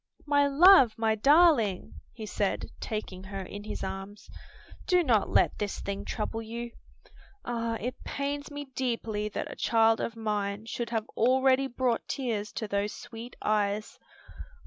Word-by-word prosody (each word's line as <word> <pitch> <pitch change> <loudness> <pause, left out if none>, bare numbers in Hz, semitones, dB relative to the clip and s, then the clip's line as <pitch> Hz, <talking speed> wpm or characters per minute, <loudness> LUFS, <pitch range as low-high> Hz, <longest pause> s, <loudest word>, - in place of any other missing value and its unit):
"My 285 -1 +3
love, 280 - +7
my 225 -1 +2
darling!" 275 - +3
he 220 -2 -8
said, 205 -1 -2
taking 205 -4 -5
her 195 0 -5
in 205 +2 -8
his - - -5
arms, 195 +2 -7 0.6
"do 360 -2 +4
not 230 -8 +2
let - - +2
this 205 -1 -3
thing 200 0 -4
trouble 225 +1 -3
you. 235 +1 -6 0.7
Ah, 230 -1 -2
it 250 +4 -5
pains 285 +1 -3
me 290 0 -6
deeply 230 -5 -2
that - - -4
a - - -8
child 225 0 +3
of 230 - -3
mine 210 -1 -2
should 235 +1 -4
have 225 -2 -2
already 260 +2 +3
brought 245 -2 -1
tears 220 -6 -2
to 220 - -4
those 200 +1 -1
sweet 230 +2 -9
eyes." 210 0 0
225 Hz, 150 wpm, -29 LUFS, 210-260 Hz, 0.7 s, love